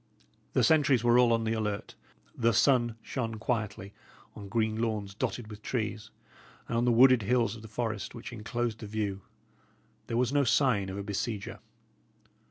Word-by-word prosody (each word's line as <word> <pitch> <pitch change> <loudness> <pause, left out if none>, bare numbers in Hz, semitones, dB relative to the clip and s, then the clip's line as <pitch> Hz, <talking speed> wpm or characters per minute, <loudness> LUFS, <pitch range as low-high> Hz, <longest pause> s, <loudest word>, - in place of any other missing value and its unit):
The - - +3
sentries 145 -7 +4
were 120 0 +5
all 120 -1 +5
on 115 -1 +2
the 110 0 0
alert. 105 -1 -3 0.4
The 115 0 +2
sun 120 0 +3
shone 115 -4 -3
quietly 110 -3 -3 0.4
on 100 -1 -9
green 110 0 0
lawns 105 -4 -2
dotted 110 +2 -3
with 105 0 -10
trees, 110 -3 -3 0.6
and - - -3
on 120 +1 +2
the 120 - +4
wooded 125 +1 +6
hills 115 +2 +1
of 110 - -11
the 110 - -10
forest 110 0 -4
which 115 +1 -8
enclosed 115 0 -3
the 110 - -7
view. 100 -2 -3 0.9
There 115 - -2
was 125 +2 +1
no 145 -1 +4
sign 120 -6 +2
of 95 - -5
a 100 - -4
besieger. 100 +1 -4
115 Hz, 175 wpm, -29 LUFS, 105-120 Hz, 0.9 s, wooded